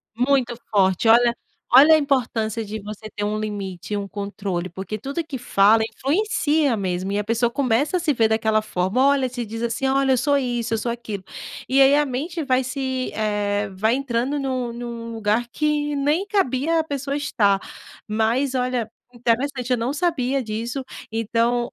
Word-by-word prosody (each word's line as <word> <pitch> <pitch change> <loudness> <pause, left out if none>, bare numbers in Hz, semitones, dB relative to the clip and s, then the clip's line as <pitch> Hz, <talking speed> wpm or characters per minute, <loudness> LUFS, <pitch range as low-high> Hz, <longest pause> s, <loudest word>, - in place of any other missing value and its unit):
Muito 250 0 +1
forte, 190 +1 +2
olha. 235 +1 +6 0.4
Olha 295 +5 +9
a - - +5
importância 230 -6 0
de 215 +1 -6
você 210 +1 -8
ter 205 - -3
um 210 +1 -1
limite 200 -3 -5
e 205 - 0
um 200 - -3
controle, 200 -2 -4
porque 190 +5 -5
tudo 280 +9 -4
que 280 -4 -6
fala 220 -2 +4
influencia 300 - +1
mesmo, 190 -1 -2
e - - 0
a 210 - 0
pessoa 230 +2 +1
começa 265 +5 +1
a - - +2
se 325 -3 +1
ver 230 -3 +3
daquela 220 0 +2
forma. 190 +3 -1
Olha, 275 -2 +2
se 245 -1 -4
diz 225 +2 -6
assim: 235 +3 -1
"Olha, 270 0 +2
eu 255 - +4
sou 285 +3 +2
isso, 240 -3 -2
eu - - +2
sou 235 +2 -2
aquilo". 215 -5 -6 0.5
E 270 +1 +4
aí 275 +1 +6
a 295 - +3
mente 310 +6 -3
vai 260 -2 +2
se, 260 0 -3
eh, 205 -1 -1
vai 220 +6 +1
entrando 270 +1 -1
num 255 -3 -2
num 235 -1 -6
lugar 225 +2 0
que 295 +2 0
nem 295 +8 +1
cabia 325 - +1
a 320 - +1
pessoa 280 -2 -3
estar. 210 -9 +2 0.5
Mas 225 +6 0
olha, 250 -3 -1 0.2
interessante, 250 +2 -1
eu 250 - +3
não 235 +4 -1
sabia 275 -5 0
disso. 230 +4 -4 0.3
Então, 230 +2 0
240 Hz, 180 wpm, -22 LUFS, 215-275 Hz, 0.5 s, Olha